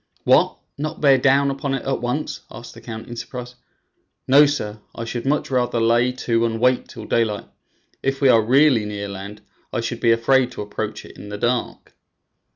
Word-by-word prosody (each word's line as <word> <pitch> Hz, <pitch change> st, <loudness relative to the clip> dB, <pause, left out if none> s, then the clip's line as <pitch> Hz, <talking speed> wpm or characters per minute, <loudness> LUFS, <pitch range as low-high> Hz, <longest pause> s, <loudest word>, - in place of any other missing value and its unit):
"What! -, -, +4 dB, 0.2 s
not 155 Hz, +2 st, -4 dB
bear 135 Hz, -3 st, +5 dB
down 140 Hz, +1 st, +3 dB
upon 135 Hz, 0 st, -2 dB
it 135 Hz, -, -5 dB
at 135 Hz, -3 st, -1 dB
once?" 135 Hz, +4 st, -2 dB
asked 120 Hz, +1 st, -10 dB
the 115 Hz, -, -13 dB
count 110 Hz, -1 st, -8 dB
in 120 Hz, -, -7 dB
surprise. 125 Hz, +1 st, -7 dB, 0.7 s
"No, 145 Hz, +3 st, +7 dB
sir; 110 Hz, -7 st, -3 dB, 0.2 s
I 115 Hz, -, -5 dB
should 120 Hz, +2 st, -4 dB
much 145 Hz, 0 st, 0 dB
rather 125 Hz, -2 st, +1 dB
lay 120 Hz, +2 st, +3 dB
to 115 Hz, -2 st, 0 dB
and 115 Hz, -1 st, -1 dB
wait 125 Hz, +1 st, +2 dB
till 110 Hz, -3 st, -10 dB
daylight. 110 Hz, -3 st, 0 dB, 0.6 s
If 135 Hz, 0 st, -1 dB
we 140 Hz, -, +4 dB
are 115 Hz, -3 st, +6 dB
really 130 Hz, +1 st, +4 dB
near 100 Hz, -1 st, -4 dB
land, 100 Hz, +1 st, -8 dB, 0.3 s
I -, -, -2 dB
should 115 Hz, 0 st, -4 dB
be 115 Hz, -, +3 dB
afraid 125 Hz, +2 st, +3 dB
to -, -, -5 dB
approach 105 Hz, +1 st, -5 dB
it -, -, -14 dB
in 105 Hz, -, -9 dB
the 105 Hz, -, -5 dB
dark." 120 Hz, +3 st, -2 dB
120 Hz, 195 wpm, -21 LUFS, 115-135 Hz, 0.7 s, No